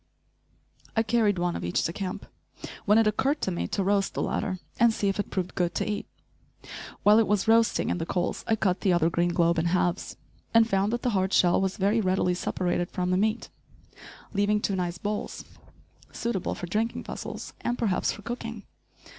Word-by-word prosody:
I 225 Hz, -, +4 dB
carried 215 Hz, -3 st, +2 dB
one 175 Hz, 0 st, 0 dB
of -, -, -4 dB
each 85 Hz, -, 0 dB
to 165 Hz, -, -1 dB
camp, 185 Hz, -1 st, -5 dB, 0.6 s
when 210 Hz, +1 st, +5 dB
it 225 Hz, -, +5 dB
occurred 270 Hz, +8 st, +1 dB
to 190 Hz, -, 0 dB
me 175 Hz, -, -2 dB
to 200 Hz, -, -1 dB
roast 195 Hz, 0 st, +1 dB
the -, -, -1 dB
latter, 185 Hz, -2 st, -1 dB, 0.2 s
and 235 Hz, 0 st, +6 dB
see 205 Hz, -2 st, 0 dB
if 195 Hz, -, -2 dB
it 205 Hz, -, -2 dB
proved 185 Hz, -2 st, -3 dB
good 175 Hz, -2 st, -1 dB
to -, -, -1 dB
eat. 210 Hz, -1 st, -3 dB, 1.0 s
While 210 Hz, +2 st, +7 dB
it 225 Hz, -, +3 dB
was 210 Hz, -1 st, +1 dB
roasting 225 Hz, +1 st, +3 dB
in -, -, -1 dB
the 165 Hz, -, -2 dB
coals, 175 Hz, -1 st, -1 dB
I 225 Hz, -, +3 dB
cut 195 Hz, -4 st, 0 dB
the 190 Hz, -, +3 dB
other 170 Hz, -1 st, +2 dB
green 175 Hz, +1 st, +1 dB
globe 170 Hz, -1 st, +2 dB
in 165 Hz, -, 0 dB
halves, 175 Hz, 0 st, 0 dB, 0.4 s
and 225 Hz, -1 st, +6 dB
found 195 Hz, -1 st, +1 dB
that 240 Hz, +1 st, -2 dB
the 250 Hz, -, +1 dB
hard 190 Hz, -1 st, 0 dB
shell 175 Hz, +1 st, +4 dB
was 190 Hz, +1 st, -1 dB
very 210 Hz, +3 st, +2 dB
readily 185 Hz, -2 st, +1 dB
separated 175 Hz, 0 st, -1 dB
from 180 Hz, 0 st, -2 dB
the -, -, +3 dB
meat, 215 Hz, +3 st, 0 dB, 0.8 s
leaving 205 Hz, +1 st, +2 dB
two 200 Hz, -1 st, -1 dB
nice 175 Hz, -2 st, -2 dB
bowls, 210 Hz, +3 st, -4 dB, 0.7 s
suitable 230 Hz, -6 st, -2 dB
for -, -, -5 dB
drinking 220 Hz, +6 st, -1 dB
vessels, -, -, -7 dB
and 240 Hz, -, -1 dB
perhaps 205 Hz, -6 st, +1 dB
for 210 Hz, -, -9 dB
cooking. 230 Hz, -2 st, -5 dB
195 Hz, 200 wpm, -27 LUFS, 180-220 Hz, 1.0 s, While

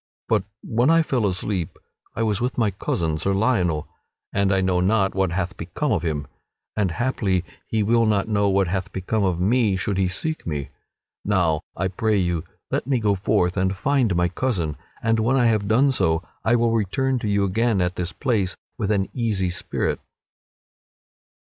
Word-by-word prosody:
But 105 Hz, -4 st, +1 dB, 0.2 s
when 120 Hz, +5 st, +2 dB
I 165 Hz, 0 st, +5 dB
fell 125 Hz, -8 st, +1 dB
asleep 90 Hz, -2 st, -2 dB, 0.4 s
I 115 Hz, -, 0 dB
was 105 Hz, -2 st, 0 dB
with 125 Hz, +1 st, -1 dB
my 110 Hz, -4 st, +2 dB
cousin, 80 Hz, -4 st, -1 dB
Sir 95 Hz, +3 st, 0 dB
Lionel, 95 Hz, -9 st, +1 dB, 0.5 s
and 100 Hz, 0 st, +2 dB
I 95 Hz, -, +3 dB
know 95 Hz, -1 st, +2 dB
not 95 Hz, +1 st, +2 dB
what 95 Hz, -2 st, +1 dB
hath 90 Hz, 0 st, -2 dB
become -, -, -2 dB
of -, -, +1 dB
him, 75 Hz, -4 st, -2 dB, 0.5 s
and 105 Hz, -3 st, +1 dB
haply 95 Hz, -4 st, 0 dB, 0.2 s
he 110 Hz, -2 st, +1 dB
will 115 Hz, +2 st, +3 dB
not 105 Hz, -1 st, +1 dB
know 100 Hz, -2 st, +2 dB
what 95 Hz, -1 st, +2 dB
hath 95 Hz, +1 st, -2 dB
become 100 Hz, +3 st, -1 dB
of 90 Hz, -3 st, +1 dB
me 105 Hz, +1 st, +2 dB
should 95 Hz, +1 st, -1 dB
he 95 Hz, -, +3 dB
seek 155 Hz, -, -3 dB
me. 75 Hz, -4 st, -3 dB, 0.5 s
Now 85 Hz, -6 st, +2 dB, 0.2 s
I 95 Hz, -, 0 dB
pray 110 Hz, +2 st, 0 dB
you 85 Hz, -4 st, 0 dB, 0.3 s
let -, -, -1 dB
me 135 Hz, -3 st, +2 dB
go 105 Hz, -2 st, +2 dB
forth 95 Hz, -2 st, +1 dB
and 95 Hz, 0 st, 0 dB
find 135 Hz, -6 st, +2 dB
my 90 Hz, 0 st, +3 dB
cousin, 85 Hz, -, -1 dB, 0.3 s
and 115 Hz, 0 st, +2 dB
when 120 Hz, +4 st, +2 dB
I 125 Hz, -2 st, +3 dB
have 110 Hz, -3 st, +2 dB
done 130 Hz, +6 st, +4 dB
so 80 Hz, -9 st, +1 dB, 0.2 s
I 110 Hz, +4 st, +3 dB
will 115 Hz, -1 st, +2 dB
return 125 Hz, +5 st, 0 dB
to 110 Hz, -, -3 dB
you 100 Hz, -1 st, +2 dB
again 110 Hz, +2 st, +1 dB
at 90 Hz, 0 st, 0 dB
this 90 Hz, 0 st, -3 dB
place 100 Hz, -7 st, 0 dB, 0.2 s
with 105 Hz, -3 st, -1 dB
an 100 Hz, -3 st, +1 dB
easy 105 Hz, -7 st, 0 dB
spirit." 85 Hz, -, -2 dB
100 Hz, 185 wpm, -23 LUFS, 90-115 Hz, 0.5 s, I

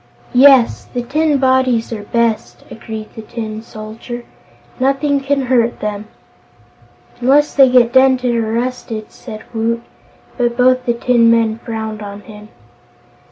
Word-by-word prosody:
"Yes, 260 Hz, -2 st, +5 dB
the 245 Hz, -1 st, -5 dB
tin 300 Hz, +3 st, +1 dB
bodies 260 Hz, -3 st, +1 dB
are 215 Hz, -, -5 dB
best," 230 Hz, +1 st, -1 dB
agreed 220 Hz, -1 st, -8 dB
the 220 Hz, -, -8 dB
Tin 220 Hz, -1 st, -6 dB
Soldier. 225 Hz, +2 st, -9 dB, 0.5 s
"Nothing 275 Hz, +2 st, +1 dB
can 275 Hz, 0 st, -1 dB
hurt 240 Hz, -2 st, +1 dB
them." 210 Hz, 0 st, -4 dB, 1.1 s
"Unless 275 Hz, +4 st, +3 dB
they 270 Hz, -2 st, +6 dB
get 245 Hz, -1 st, +4 dB
dented 260 Hz, -2 st, +3 dB
or 225 Hz, -1 st, -1 dB
rusted," 230 Hz, -2 st, -4 dB
said 215 Hz, 0 st, -10 dB
Woot, 230 Hz, +1 st, -1 dB, 0.6 s
but 240 Hz, -1 st, 0 dB
both 255 Hz, 0 st, +3 dB
the 235 Hz, -, +2 dB
tin 235 Hz, -1 st, +3 dB
men 230 Hz, -1 st, +2 dB
frowned 220 Hz, -2 st, -5 dB
on 200 Hz, 0 st, -8 dB
him. 210 Hz, 0 st, -13 dB
235 Hz, 135 wpm, -16 LUFS, 220-255 Hz, 1.1 s, they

